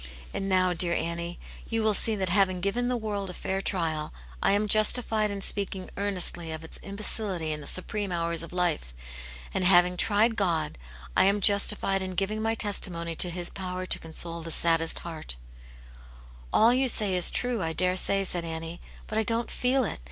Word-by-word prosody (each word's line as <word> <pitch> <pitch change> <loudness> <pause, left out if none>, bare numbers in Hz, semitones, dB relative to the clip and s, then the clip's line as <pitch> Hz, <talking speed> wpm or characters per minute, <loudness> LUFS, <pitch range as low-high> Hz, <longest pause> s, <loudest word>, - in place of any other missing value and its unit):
And 195 0 -3
now, 185 -1 +2
dear 170 0 +2
Annie, 170 +1 -4 0.3
you 225 -1 -1
will 215 -1 +2
see 220 +2 +1
that 190 -3 -2
having 185 0 +2
given 200 +7 -1
the 250 0 0
world 205 -4 -4
a 180 - -7
fair 190 0 -3
trial, 160 -6 -2 0.3
I - - +3
am 210 +1 +1
justified 215 0 +2
in 200 -1 -5
speaking 195 -2 -1
earnestly 180 -4 +1
of 160 0 -6
its 160 - -5
imbecility 200 -4 -1
in 150 0 -3
the 140 - -10
supreme 200 +1 -2
hours 170 -1 -1
of 165 - -8
life; 175 - -2 0.6
and 190 - 0
having 180 0 +5
tried 220 +4 +2
God, 170 - -1 0.4
I - - +5
am 200 +1 +3
justified 200 -1 +4
in 185 -1 -4
giving 205 +3 -2
my 225 +1 0
testimony 175 -6 0
to 180 - +2
His 175 0 -5
power 185 -1 -5
to - - 0
console 165 +1 -4
the 165 - -7
saddest 165 0 +1
heart/' 160 - -8 1.2
"All 230 +3 +5
you 260 +1 +2
say 210 -6 +3
is 180 - +6
true, 245 -3 -2
I 165 -2 -2
daresay," 185 +3 +2
said 180 -2 -2
Annie. 165 +1 -6 0.2
"But 215 - -2
I - - +2
don't 230 +2 -2
feel 255 +1 +1
it. 215 - -4
185 Hz, 190 wpm, -27 LUFS, 170-210 Hz, 1.2 s, is